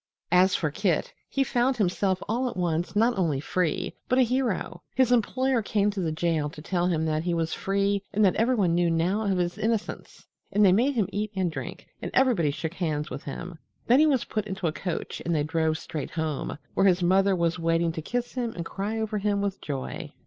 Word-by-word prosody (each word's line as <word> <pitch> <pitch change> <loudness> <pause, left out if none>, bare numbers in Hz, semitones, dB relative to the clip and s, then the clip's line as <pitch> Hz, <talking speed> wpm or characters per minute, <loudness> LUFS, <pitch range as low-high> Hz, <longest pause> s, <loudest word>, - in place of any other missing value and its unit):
As 185 +1 +5
for 155 -3 0
Kit, 180 -1 0 0.2
he 275 - +1
found 255 0 +1
himself 190 -2 +1
all 245 +4 0
at - - -8
once 175 +1 -1
not 230 +3 +3
only 155 -7 +1
free, 165 +2 -1 0.2
but 255 - +3
a 260 - +6
hero. 235 -8 -1
His 255 -2 +3
employer 255 +2 +2
came 205 -1 +1
to 200 - -5
the 165 -4 0
jail 160 -2 0
to 150 +1 -12
tell 175 0 0
him 160 -3 +1
that 155 -1 0
he 175 +1 -1
was 165 -1 -1
free 200 +1 0
and 210 +1 +3
that 185 - +4
everyone 220 -7 +2
knew 175 0 +2
now 170 +6 +1
of 190 - +1
his 175 +3 -1
innocence, 220 0 -3 0.3
and 205 +1 +4
they 185 - +7
made 250 +9 +3
him 215 -6 +1
eat 210 +1 -2
and 185 -3 0
drink, 135 -5 -7 0.2
and - - -4
everybody 235 - +3
shook 155 +3 -4
hands 155 -5 -2
with 135 +2 -6
him. 170 +4 -7 0.3
Then 250 +3 +5
he 310 - +6
was 265 -6 +2
put 215 -1 -3
into 190 -2 -4
a 160 - +2
coach 180 0 -4
and 170 0 0
they 150 - +1
drove 160 0 0
straight 155 -2 -5
home, 160 -4 -3 0.2
where 195 - +3
his 180 -1 +3
mother 190 +2 +4
was 170 0 0
waiting 165 0 +1
to 160 - -5
kiss 245 +9 -3
him 240 -3 -2
and 170 - -4
cry 205 +5 -3
over 220 -1 -1
him 200 0 +1
with 200 -1 -2
joy. 145 +2 -5
185 Hz, 220 wpm, -26 LUFS, 165-215 Hz, 0.3 s, they